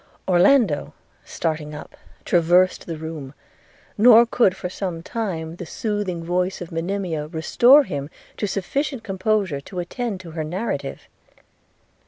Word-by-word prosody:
Orlando, 185 - +3 0.3
starting 155 -2 -3
up, 150 - -10 0.3
traversed 175 +2 +3
the 165 -2 -4
room; 155 -3 -7 0.6
nor 235 +1 +8
could, 230 -5 +2
for - - -4
some 180 -2 -5
time, 170 -7 -4
the 175 - -6
soothing 205 -6 -3
voice 180 +2 -1
of 175 - -8
Monimia 165 -2 -3
restore 240 - +5
him 145 - -5 0.3
to 210 - -1
sufficient 255 +7 -2
composure 195 -6 -1
to 180 - -11
attend 200 +4 -3
to 170 -3 -10
her 160 -1 -3
narrative. 185 +9 -4
180 Hz, 130 wpm, -22 LUFS, 160-210 Hz, 0.6 s, nor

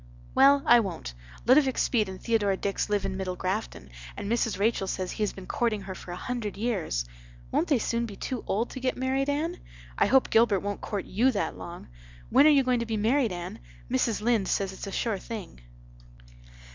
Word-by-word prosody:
"Well, 275 +1 +6
I 240 0 +7
won't. 175 - -4 0.3
Ludovic 265 +1 +4
Speed 215 -5 +1
and 190 0 -7
Theodora 205 -4 +1
Dix 200 +1 -2
live 205 -1 +1
in 190 - -2
Middle 185 -1 -3
Grafton 185 - -4 0.3
and 200 - -4
Mrs. 230 -3 +1
Rachel 205 -1 +1
says 185 -1 -3
he - - -6
has 210 - +1
been 190 - -10
courting 225 -1 0
her 190 -1 -6
for 185 - -9
a - - -4
hundred 220 0 -4
years. 195 - -1 0.5
Won't - - +1
they 280 - +3
soon 235 +1 -1
be 205 - -9
too 250 +4 -4
old 225 +5 0
to 260 - -6
get 255 0 -1
married, 265 +2 0
Anne? 320 +5 -1 0.4
I - - +4
hope 265 -1 +3
Gilbert 220 -4 +4
won't 205 0 -4
court 205 -3 -3
you 235 +7 +2
that 200 - -1
long. 175 0 -9 0.4
When 290 - +7
are - - +8
you 285 -3 +5
going 250 -1 +2
to 235 - -3
be 225 -1 -1
married, 230 +2 +2
Anne? 175 0 -6 0.3
Mrs. 210 - +1
Lynde 225 -5 +2
says 195 -1 0
it's 190 - -7
a - - -5
sure 215 -1 -1
thing." 200 - -8
215 Hz, 210 wpm, -27 LUFS, 190-245 Hz, 0.5 s, are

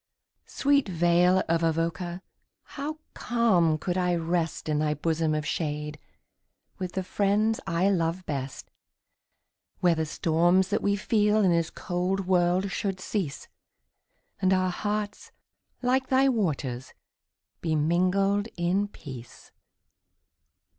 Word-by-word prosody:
Sweet 280 -5 +2
vale 175 +2 +3
of 165 0 +1
Avoca! 170 +2 -1 0.5
how 300 +2 -4 0.2
calm 190 -10 +2
could 180 +3 -2
I 180 -1 +1
rest 165 -1 -2
In 150 -1 +1
thy 150 0 +1
bosom 160 +1 0
of 150 0 -2
shade, 150 -1 -3 0.8
with 185 -1 -4
the 190 - -2
friends 210 +4 +1
I 170 +3 +1
love 175 0 -1
best. 135 -2 -5 1.1
Where 175 -2 +4
the 160 -1 -2
storms 175 +4 +2
that 205 - 0
we 200 0 +2
feel 210 +1 +2
in 185 - +4
this 170 -1 +1
cold 185 +2 -2
world 180 +1 +2
should 195 -2 -2
cease, 185 -8 -3 0.9
And 185 0 +3
our 185 0 +1
hearts, 205 +2 -3 0.5
like 260 +1 +2
thy 265 +1 +4
waters, 145 - -2 0.7
be 160 -2 0
mingled 185 +6 +2
in 180 +4 +1
peace. 130 - -11
180 Hz, 120 wpm, -27 LUFS, 165-200 Hz, 1.1 s, Where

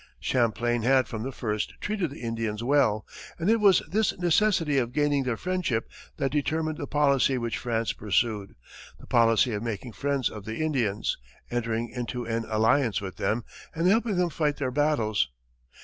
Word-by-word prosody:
Champlain 120 -1 +1
had 130 +1 +3
from 110 - -5
the 130 +4 -3
first 105 -4 -3
treated 200 -6 -1
the 140 - -10
Indians 115 -1 -2
well, 125 -5 +2 0.3
and 175 +6 +1
it 230 - +3
was 200 -3 +5
this 215 +1 0
necessity 175 -4 +2
of 120 -1 -2
gaining 145 -1 +2
their 120 -3 -1
friendship 180 -11 -1 0.3
that 135 -3 0
determined 155 +2 -1
the 145 - -4
policy 140 -3 +3
which 115 -2 -2
France 115 -2 -1
pursued 105 0 -1 0.4
the - - -13
policy 115 +1 +3
of 105 - -2
making 115 +1 -4
friends 135 +4 0
of 105 - -7
the 110 +2 -5
Indians, 125 -10 -1 0.3
entering 115 -1 -1
into 120 0 -4
an 115 0 -2
alliance 115 +2 +2
with 95 -4 -7
them, 115 +2 0 0.3
and 165 +1 0
helping 220 +2 +3
them 175 -1 +1
fight 150 -1 0
their 130 -3 -2
battles. 125 - +1
125 Hz, 170 wpm, -27 LUFS, 115-150 Hz, 0.4 s, was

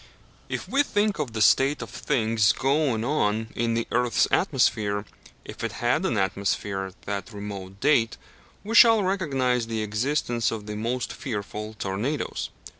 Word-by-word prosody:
If - - -4
we 275 - +3
think 205 - 0
of 135 -7 -3
the 110 -1 +2
state 135 +6 +4
of - - -10
things 110 -3 +2
going 135 -4 +1
on 110 -5 0
in 115 0 0
the 115 - -1
earth's 125 0 +2
atmosphere, 100 -1 +1 0.4
if - - -8
it 115 -2 -2
had 120 - +1
an 115 - -1
atmosphere 95 0 -1
at 95 - -15
that 100 +2 -4
remote 100 -2 -7
date, 125 -5 +2 0.5
we 215 +3 -4
shall 225 -2 +7
recognize 135 -11 0
the 110 -1 -2
existence 120 +2 0
of 110 -2 -5
the 105 0 -5
most 115 +3 -2
fearful 105 -2 -5
tornadoes. 105 +10 -3
115 Hz, 155 wpm, -25 LUFS, 105-135 Hz, 0.5 s, shall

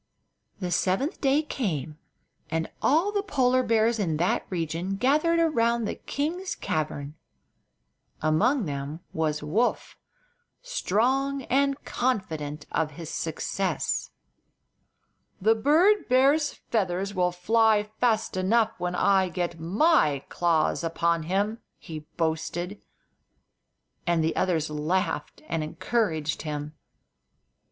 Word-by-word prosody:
The 180 -3 -3
seventh 195 - 0
day 280 +2 +3
came, 160 - -3 0.5
and 165 0 -1
all 330 +8 +3
the 410 -1 0
Polar 255 -9 +2
bears 230 -1 +2
in 165 -6 0
that 175 +3 0
region 170 +2 -2
gathered 300 +9 +2
around 235 -8 +2
the - - -2
king's 345 +7 -3
cavern. 150 -2 -3 1.1
Among 160 - +2
them 145 +2 -5
was 155 -2 -1
Woof, 210 +12 -1 0.6
strong 270 - 0
and 275 +2 +1
confident 160 - -2
of 155 -1 -1
his 165 0 -7
success. 185 +4 -2 1.3
"The 215 +3 +4
bird 325 - +3
bear's 280 +4 +4
feathers 195 -2 -2
will 180 -2 +1
fly 215 +4 +3 0.2
fast 225 -5 +1
enough 220 +4 +2
when 180 0 -2
I 190 0 +3
get 175 -1 -3
my 170 - +2
claws 170 -1 +1
upon 165 0 0
him!" 205 +4 0 0.2
he 155 -2 -9
boasted; 170 +4 -2 1.3
and 170 -2 +2
the 160 - 0
others 165 -4 +1
laughed 155 - -2
and 165 -1 -1
encouraged 160 -2 -1
him. 150 -1 -5
190 Hz, 110 wpm, -26 LUFS, 160-250 Hz, 1.3 s, The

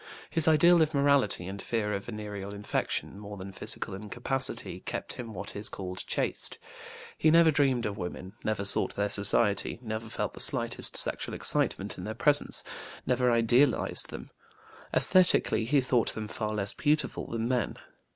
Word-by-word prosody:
His 165 -1 +5
ideal 170 +2 +5
of 155 -1 0
morality 140 -9 +2
and 95 +2 -6
fear 105 -3 -2
of 100 0 -4
venereal 105 -3 -7
infection, 100 -1 -3
more 105 0 -9
than 95 +1 -8
physical 95 - 0
incapacity, 120 +6 -2
kept - - -5
him 120 -2 -8
what 100 0 -8
is 105 +1 -2
called 90 -1 -7
chaste. - - 0 0.6
He 155 - +3
never 165 0 +5
dreamed 135 -5 +1
of 105 0 -4
women, 90 +2 -7
never 110 -2 -2
sought 100 - -1
their 100 0 -2
society, 100 0 +1
never 110 -1 -6
felt - - -4
the - - -12
slightest - - +5
sexual - - +2
excitement - - 0
in - - -7
their - - -6
presence, - - +1 0.4
never 125 0 +1
idealized 120 +4 +2
them. - - -9 0.6
Esthetically, 185 - +4
he 140 +3 +2
thought 125 -2 0
them 110 -1 -5
far 110 0 -4
less 105 -2 -2
beautiful 150 -2 -1
than 115 0 -3
men. 125 -1 -2
110 Hz, 160 wpm, -28 LUFS, 100-135 Hz, 0.6 s, His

